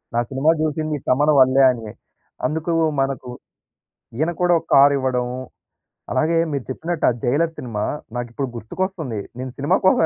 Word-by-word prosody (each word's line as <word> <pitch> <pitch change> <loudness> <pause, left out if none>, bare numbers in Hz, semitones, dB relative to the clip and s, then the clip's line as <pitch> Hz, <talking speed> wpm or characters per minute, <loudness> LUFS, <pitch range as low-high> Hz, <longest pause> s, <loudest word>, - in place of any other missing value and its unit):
"నా 120 - +3
సినిమా 140 +4 +3
చూసింది 155 -1 -1
తమన్ 145 +4 +4
వల్లే" 130 +1 +5
అని. 115 -3 -7 0.6
అందుకు 160 +2 -2 0.3
మనకు 135 -2 -2 0.9
ఈయన‌ 165 +3 +1
కూడా 175 -1 +4
ఒక - - -22
కార్ 140 +1 +7
ఇవ్వడం. 130 -2 0 0.9
అలాగే 165 +2 +2
మీరు 140 -3 -2
చెప్పినట్టు 165 +4 -2
ఆ - - +2
'జైలర్' 160 +6 +1
సినిమా 105 -4 -3 0.3
నాకు 120 -1 -4
ఇప్పుడు 135 -1 -3
గుర్తుకొస్తుంది. 155 - -4 0.2
నేను 130 0 -5
సినిమా 145 +7 +2
కోసం 185 - +5
140 Hz, 150 wpm, -21 LUFS, 125-160 Hz, 0.9 s, కార్